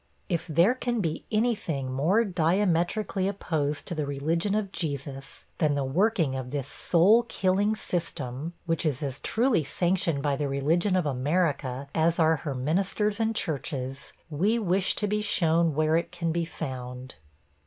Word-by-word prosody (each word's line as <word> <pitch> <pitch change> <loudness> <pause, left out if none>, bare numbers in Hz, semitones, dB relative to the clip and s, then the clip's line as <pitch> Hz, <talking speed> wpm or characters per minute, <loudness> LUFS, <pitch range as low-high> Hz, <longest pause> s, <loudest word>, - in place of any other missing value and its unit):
' - - -39
If - - -15
there 170 - +4
can 245 -2 -2
be 165 -6 -2
any 230 +3 +3
thing 140 - -4
more 175 - +2
diametrically 185 +2 +1
opposed 155 -7 -2
to - - -3
the 155 -3 -2
religion 165 +8 0
of 210 -3 -1
Jesus, 140 -5 -5
than 150 -3 +2
the 140 - 0
working 165 +1 +1
of 130 -1 -4
this 140 -1 -3
soul 185 +10 +4
killing 200 +3 +1
system 165 - -4
which 165 -2 -1
is 150 -2 -1
as 140 -1 -3
truly 230 - +2
sanctioned 165 -1 0
by 145 -1 +1
the 145 - -1
religion 160 +8 +1
of 180 -3 +1
America 140 -1 0
as 165 +1 +2
are 160 -1 +4
her 145 -2 -4
ministers 195 - 0
and 225 0 0
churches 135 -6 -3 0.2
we 195 +10 +2
wish 190 -3 +1
to 210 - -1
be 210 +1 0
shown 170 -5 +2
where 155 +1 +2
it 170 - 0
can 170 -2 -2
be 170 +1 0
found. 130 -5 -6
165 Hz, 165 wpm, -27 LUFS, 140-195 Hz, 0.2 s, there